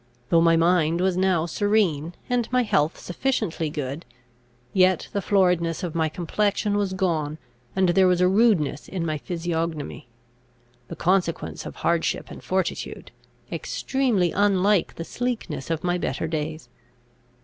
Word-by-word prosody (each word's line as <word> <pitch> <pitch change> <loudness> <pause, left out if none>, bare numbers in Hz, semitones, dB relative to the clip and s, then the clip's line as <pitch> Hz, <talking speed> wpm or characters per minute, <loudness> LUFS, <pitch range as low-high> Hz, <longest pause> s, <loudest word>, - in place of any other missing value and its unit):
Though 165 - +5
my 165 0 +5
mind 170 -1 +3
was 185 0 +1
now 185 -3 +2
serene, 175 -4 +1
and 245 -2 0
my 250 0 +3
health 160 -7 +1
sufficiently 180 - -2
good, 145 0 -4 0.7
yet 185 -2 +3
the 200 - 0
floridness 180 -3 +2
of 175 -3 -3
my 160 -1 +1
complexion 205 +5 0
was 200 -2 0
gone, 160 -5 -1 0.4
and 190 -1 +3
there 185 +1 +5
was 180 -1 +3
a 180 - +4
rudeness 190 -8 +2
in 180 -3 -3
my 155 -2 -2
physiognomy, 165 -4 -3 0.8
the - - -7
consequence 175 0 0
of - - -8
hardship 170 -1 -1
and - - -10
fortitude, 185 -2 -3 0.4
extremely 235 -11 0
unlike 200 -1 +2
the 165 - -6
sleekness 230 - -3
of 165 -1 -2
my 180 0 0
better 160 - -2
days. 155 -2 -4
175 Hz, 140 wpm, -24 LUFS, 160-195 Hz, 0.8 s, Though